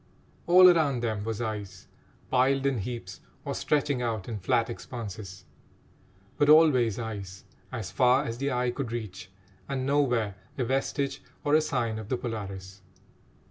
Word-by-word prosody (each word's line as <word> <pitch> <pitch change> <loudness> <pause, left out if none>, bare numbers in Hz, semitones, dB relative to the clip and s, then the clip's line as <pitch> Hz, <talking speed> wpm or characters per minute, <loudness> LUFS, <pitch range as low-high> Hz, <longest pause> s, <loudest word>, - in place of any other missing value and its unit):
All 185 +1 +8
around 155 -8 +4
them 110 -3 -1
was 110 0 -3
ice, 105 -4 -5 0.5
piled 135 +1 +3
in 135 -4 +1
heaps, 100 -3 -6 0.2
or - - -2
stretching 145 -3 0
out 110 -5 -2
in 110 -3 -4
flat 115 +5 +1
expanses; 105 -6 -7 0.9
but 145 - +3
always 135 -9 +5
ice, 100 -5 -6 0.3
as 115 -7 -5
far 130 +1 +4
as 115 -2 -5
the 140 +1 -1
eye 125 0 0
could 125 -2 -4
reach, 100 -6 -6 0.4
and 130 -2 -2
nowhere 125 -7 +1 0.2
a 130 - 0
vestige 135 +2 -1 0.2
or 145 - +1
a 155 - +6
sign 120 -7 -1
of 110 -1 -8
the 130 - 0
Polaris. 100 -5 -6
120 Hz, 150 wpm, -28 LUFS, 105-135 Hz, 0.9 s, All